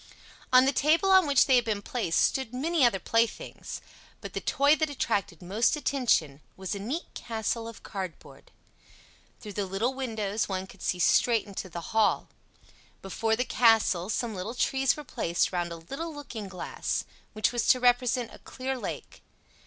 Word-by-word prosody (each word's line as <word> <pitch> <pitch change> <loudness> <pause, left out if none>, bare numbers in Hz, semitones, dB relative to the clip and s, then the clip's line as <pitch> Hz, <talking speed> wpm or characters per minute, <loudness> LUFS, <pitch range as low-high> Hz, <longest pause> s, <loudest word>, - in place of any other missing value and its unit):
On 255 0 +7
the 270 - +3
table 320 +7 +3
on 375 -4 +6
which 280 -2 +5
they 265 -3 +5
had 245 - +2
been 210 -2 -2
placed 215 -9 -1
stood 255 -3 0
many 315 +3 +1
other 235 -5 +4
playthings, 230 +5 -2 0.4
but - - -8
the - - -3
toy 285 +2 +3
that 310 -1 0
attracted 200 - -2
most 210 - +2
attention 235 - +1 0.2
was 190 +1 -4
a 200 - -4
neat 265 - -4
castle 225 0 -3
of 230 - -10
cardboard. 190 -4 -8 0.9
Through 210 -2 -9
the 200 0 -2
little 210 +7 -1
windows 220 -6 -2
one 190 -1 -2
could 190 0 -16
see 180 - -1
straight 225 +5 +3
into 195 -2 -7
the 170 +3 -7
hall. 220 -1 +2 0.7
Before 220 +3 0
the 250 +3 -1
castle 220 -8 +3
some 230 0 -1
little 200 +5 -5
trees 265 +1 +1
were 300 - -7
placed 170 -10 -1
round 175 -2 -2
a - - -4
little 275 - -6
looking 265 -8 -7
glass, 185 -1 -3 0.3
which 215 +2 +1
was 240 -1 -1
to 255 - +5
represent 245 -1 +2
a - - -12
clear 265 +1 -4
lake. - - -7
230 Hz, 175 wpm, -28 LUFS, 195-265 Hz, 0.9 s, On